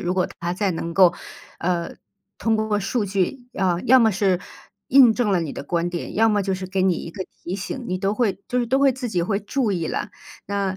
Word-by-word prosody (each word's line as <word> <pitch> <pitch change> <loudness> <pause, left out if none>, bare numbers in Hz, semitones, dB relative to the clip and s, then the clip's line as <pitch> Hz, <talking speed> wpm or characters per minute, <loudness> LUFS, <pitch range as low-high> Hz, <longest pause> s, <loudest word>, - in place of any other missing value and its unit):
如 180 +1 -1
果 185 - +1
它 170 +1 -2
再 195 +1 0
能 165 +1 -4
够， 180 -1 +5 0.4
呃， 175 -1 -2 0.4
通 225 -1 +1
过 215 -1 0
数 215 +2 -1
据， 200 +6 -2
啊， 180 -3 +1
要 260 +3 +7
么 225 -2 +5
是 190 -2 +1 0.5
印 250 -4 +7
证 240 -5 +1
了 185 - +3
你 160 -4 -4
的 - - -6
观 170 +3 -1
点， 175 -1 -5
要 225 +1 +5
么 205 -2 +2
就 195 0 -1
是 185 0 -5
给 190 0 -1
你 185 -2 +3
一 165 - -6
个 190 +1 -5 0.2
提 180 - -4
醒， 220 +6 -5
你 185 - -1
都 195 +1 0
会 210 -4 0
就 250 - 0
是 240 - 0
都 265 +3 +2
会 275 -2 +5
自 250 -1 -5
己 180 -5 0
会 200 +2 0
注 225 +2 -1
意 170 -3 -2
了。 - - -3 0.4
那 200 -1 -1
195 Hz, 255 characters per minute, -23 LUFS, 180-225 Hz, 0.5 s, 要